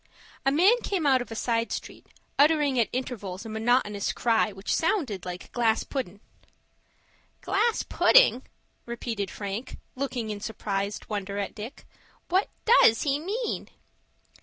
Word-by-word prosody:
A -, -, +5 dB
man 390 Hz, -, +4 dB
came 370 Hz, -6 st, -1 dB
out 265 Hz, -3 st, +4 dB
of 245 Hz, -, -7 dB
a 225 Hz, -, -6 dB
side 230 Hz, 0 st, 0 dB
street, -, -, -6 dB, 0.3 s
uttering 290 Hz, -3 st, +4 dB
at 230 Hz, -, +2 dB
intervals 220 Hz, -6 st, -4 dB
a -, -, -6 dB
monotonous 220 Hz, -2 st, +1 dB
cry 225 Hz, -2 st, +2 dB
which 195 Hz, +1 st, -3 dB
sounded 275 Hz, -, 0 dB
like 180 Hz, 0 st, -7 dB
"glass 225 Hz, -2 st, +2 dB
puddin'." 205 Hz, -8 st, -5 dB, 1.2 s
"Glass 445 Hz, +3 st, +1 dB
pudding!" -, -, +5 dB, 0.5 s
repeated 230 Hz, -4 st, -3 dB
Frank, 205 Hz, +5 st, -5 dB, 0.2 s
looking 255 Hz, -5 st, -3 dB
in 205 Hz, -, -5 dB
surprised 200 Hz, -1 st, -3 dB
wonder 200 Hz, -1 st, -4 dB
at 200 Hz, -, -3 dB
Dick. 220 Hz, +4 st, -9 dB, 0.4 s
"What 375 Hz, +3 st, +2 dB, 0.2 s
does 430 Hz, -, +6 dB
he 280 Hz, -1 st, +1 dB
mean?" 430 Hz, +9 st, -3 dB
235 Hz, 135 wpm, -27 LUFS, 205-285 Hz, 1.2 s, does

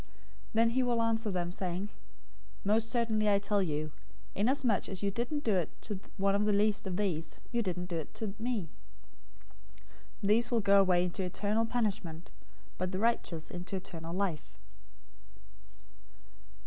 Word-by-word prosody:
025:045 -, -, -21 dB, 0.5 s
"Then 230 Hz, +1 st, +5 dB
he 260 Hz, +2 st, +2 dB
will 240 Hz, -2 st, +2 dB
answer 225 Hz, -1 st, +1 dB
them, 175 Hz, -2 st, -1 dB
saying, 185 Hz, +2 st, -3 dB, 0.7 s
'Most 220 Hz, +3 st, +2 dB
certainly 220 Hz, -3 st, +2 dB
I 200 Hz, -, +5 dB
tell 200 Hz, 0 st, +1 dB
you, 155 Hz, -3 st, -1 dB, 0.4 s
inasmuch 235 Hz, 0 st, +2 dB
as 190 Hz, 0 st, -3 dB
you 200 Hz, -, +2 dB
didn't 245 Hz, +8 st, -2 dB
do 220 Hz, -, +2 dB
it 175 Hz, -4 st, +1 dB
to 205 Hz, -3 st, -3 dB, 0.2 s
one 195 Hz, 0 st, +3 dB
of 205 Hz, +1 st, +2 dB
the 210 Hz, -, +3 dB
least 205 Hz, 0 st, +2 dB
of 180 Hz, -1 st, -2 dB
these, 170 Hz, -6 st, -1 dB
you 235 Hz, -1 st, +1 dB
didn't 180 Hz, -4 st, -2 dB
do 175 Hz, -2 st, -3 dB
it 160 Hz, -, -5 dB
to 215 Hz, -3 st, -3 dB
me.' 225 Hz, -8 st, -2 dB, 1.5 s
025:046 -, -, +2 dB
These 230 Hz, +3 st, +4 dB
will 235 Hz, -, +3 dB
go 200 Hz, 0 st, +6 dB
away 180 Hz, -2 st, +4 dB
into 180 Hz, +2 st, -2 dB
eternal 210 Hz, +5 st, 0 dB
punishment, 190 Hz, -9 st, -2 dB, 0.5 s
but 185 Hz, 0 st, -1 dB
the 185 Hz, -, -2 dB
righteous 190 Hz, -7 st, 0 dB
into 180 Hz, +2 st, -4 dB
eternal 165 Hz, -3 st, -6 dB
life." 185 Hz, -6 st, -2 dB
200 Hz, 160 wpm, -32 LUFS, 180-225 Hz, 1.5 s, go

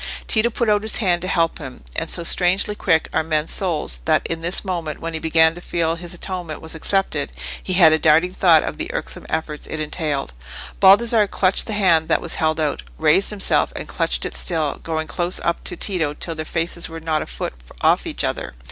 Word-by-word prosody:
Tito 225 Hz, +1 st, +2 dB
put 235 Hz, 0 st, -2 dB
out 210 Hz, -1 st, +3 dB
his 220 Hz, 0 st, +2 dB
hand 180 Hz, -5 st, +1 dB
to 185 Hz, -, -3 dB
help 165 Hz, -2 st, 0 dB
him, 130 Hz, -, -9 dB
and 165 Hz, -, -3 dB
so 170 Hz, -, -1 dB
strangely 185 Hz, +4 st, +2 dB
quick 165 Hz, -6 st, +1 dB
are -, -, +2 dB
men's 155 Hz, -1 st, -1 dB
souls 155 Hz, -, -1 dB
that -, -, +2 dB
in 165 Hz, 0 st, -3 dB
this 175 Hz, +5 st, -1 dB
moment, 170 Hz, -5 st, -4 dB
when 165 Hz, 0 st, -5 dB
he 160 Hz, -, -2 dB
began 160 Hz, 0 st, +3 dB
to 175 Hz, -, -11 dB
feel 165 Hz, -2 st, -1 dB
his 170 Hz, 0 st, -8 dB
atonement 175 Hz, -3 st, -4 dB
was 160 Hz, -, -6 dB
accepted, 160 Hz, -3 st, -1 dB, 0.3 s
he 185 Hz, -, -3 dB
had 170 Hz, -4 st, +6 dB
a 160 Hz, -, +2 dB
darting 165 Hz, +4 st, +3 dB
thought 170 Hz, -5 st, +5 dB
of -, -, -5 dB
the -, -, -4 dB
irksome -, -, -5 dB
efforts 155 Hz, -2 st, -3 dB
it 160 Hz, -, -5 dB
entailed. 150 Hz, -, -3 dB, 0.5 s
Baldassarre 210 Hz, +2 st, +5 dB
clutched 185 Hz, -1 st, +2 dB
the 220 Hz, -, -2 dB
hand 170 Hz, -6 st, +3 dB
that 160 Hz, -, +2 dB
was 170 Hz, -, -1 dB
held 155 Hz, 0 st, +1 dB
out, 150 Hz, -2 st, -1 dB, 0.2 s
raised 160 Hz, +5 st, +3 dB
himself 205 Hz, -2 st, +2 dB
and -, -, -6 dB
clutched -, -, -1 dB
it -, -, -5 dB
still, 160 Hz, -5 st, 0 dB
going 160 Hz, -1 st, -3 dB
close 175 Hz, +2 st, -1 dB
up 170 Hz, -, -1 dB
to 175 Hz, -, 0 dB
Tito 160 Hz, -7 st, 0 dB
till 165 Hz, -, -3 dB
their 155 Hz, -1 st, -5 dB
faces 165 Hz, +1 st, -3 dB
were 165 Hz, 0 st, -7 dB
not 160 Hz, -1 st, -1 dB
a -, -, -6 dB
foot -, -, -5 dB, 0.3 s
off -, -, +2 dB
each -, -, -3 dB
other. -, -, -3 dB
165 Hz, 220 wpm, -20 LUFS, 160-185 Hz, 0.5 s, had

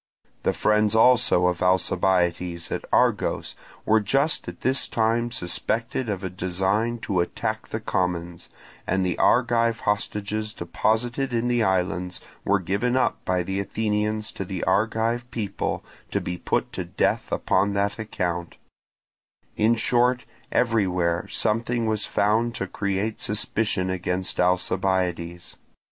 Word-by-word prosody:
The -, -, +1 dB
friends 105 Hz, 0 st, +2 dB
also 115 Hz, -6 st, +5 dB
of 90 Hz, -1 st, +1 dB
Alcibiades 90 Hz, -2 st, +1 dB
at -, -, -3 dB
Argos -, -, +1 dB, 0.3 s
were 110 Hz, +1 st, +4 dB
just 135 Hz, +9 st, +1 dB
at -, -, -8 dB
this 130 Hz, +2 st, +1 dB
time 115 Hz, +1 st, +1 dB
suspected 115 Hz, +4 st, -1 dB
of 100 Hz, -2 st, -3 dB
a 95 Hz, -, -2 dB
design 95 Hz, +6 st, 0 dB
to 95 Hz, -6 st, -1 dB
attack 85 Hz, -, -2 dB
the -, -, -4 dB
commons; 85 Hz, -2 st, -2 dB, 0.4 s
and 95 Hz, 0 st, +1 dB
the 90 Hz, -, 0 dB
Argive 115 Hz, -2 st, +3 dB
hostages 105 Hz, +1 st, -2 dB
deposited 115 Hz, +9 st, 0 dB
in 115 Hz, +1 st, 0 dB
the 120 Hz, -1 st, +2 dB
islands 90 Hz, -2 st, 0 dB, 0.2 s
were 100 Hz, -, +3 dB
given 100 Hz, +8 st, 0 dB
up -, -, 0 dB
by 90 Hz, -1 st, +1 dB
the 95 Hz, +2 st, -2 dB
Athenians 105 Hz, +1 st, -1 dB
to -, -, -5 dB
the 95 Hz, -1 st, -4 dB
Argive 115 Hz, +5 st, +1 dB
people 105 Hz, -5 st, -3 dB, 0.3 s
to -, -, 0 dB
be 90 Hz, -, -4 dB
put 90 Hz, -, -1 dB
to -, -, -3 dB
death -, -, -1 dB
upon 100 Hz, +2 st, +1 dB
that 100 Hz, +2 st, 0 dB
account: 90 Hz, -5 st, -3 dB, 1.0 s
in 110 Hz, +2 st, +3 dB
short, 125 Hz, +2 st, +2 dB, 0.3 s
everywhere 90 Hz, -8 st, +1 dB
something 115 Hz, +2 st, 0 dB
was 110 Hz, -1 st, -1 dB
found 115 Hz, +3 st, +1 dB
to -, -, -2 dB
create 100 Hz, +2 st, -2 dB
suspicion 105 Hz, -2 st, 0 dB
against 95 Hz, 0 st, -2 dB
Alcibiades. 90 Hz, -1 st, 0 dB
100 Hz, 130 wpm, -25 LUFS, 90-115 Hz, 1.0 s, also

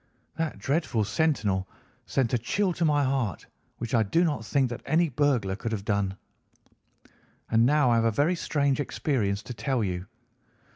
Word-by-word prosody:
That 165 Hz, -1 st, -2 dB
dreadful 140 Hz, -6 st, 0 dB
sentinel 105 Hz, -8 st, 0 dB, 0.4 s
sent 130 Hz, -4 st, 0 dB
a -, -, +4 dB
chill 185 Hz, -, 0 dB
to 170 Hz, -, -2 dB
my 145 Hz, -2 st, +3 dB
heart 130 Hz, -7 st, -1 dB, 0.3 s
which 120 Hz, +2 st, -5 dB
I 115 Hz, -, +4 dB
do 110 Hz, -, +2 dB
not 150 Hz, -9 st, 0 dB
think 130 Hz, +4 st, +1 dB
that 120 Hz, -, -5 dB
any 165 Hz, +1 st, +2 dB
burglar 125 Hz, -8 st, +1 dB
could 110 Hz, +3 st, -4 dB
have 105 Hz, -3 st, -3 dB
done. 100 Hz, -2 st, 0 dB, 1.3 s
"And 115 Hz, +1 st, +4 dB
now 145 Hz, -3 st, +4 dB
I 115 Hz, -, +4 dB
have 115 Hz, -, +2 dB
a -, -, +4 dB
very 145 Hz, +10 st, +2 dB
strange 145 Hz, -5 st, 0 dB
experience 110 Hz, -8 st, -1 dB
to 125 Hz, -, -7 dB
tell 130 Hz, -1 st, -1 dB
you. 90 Hz, -1 st, -3 dB
125 Hz, 175 wpm, -27 LUFS, 105-145 Hz, 1.3 s, a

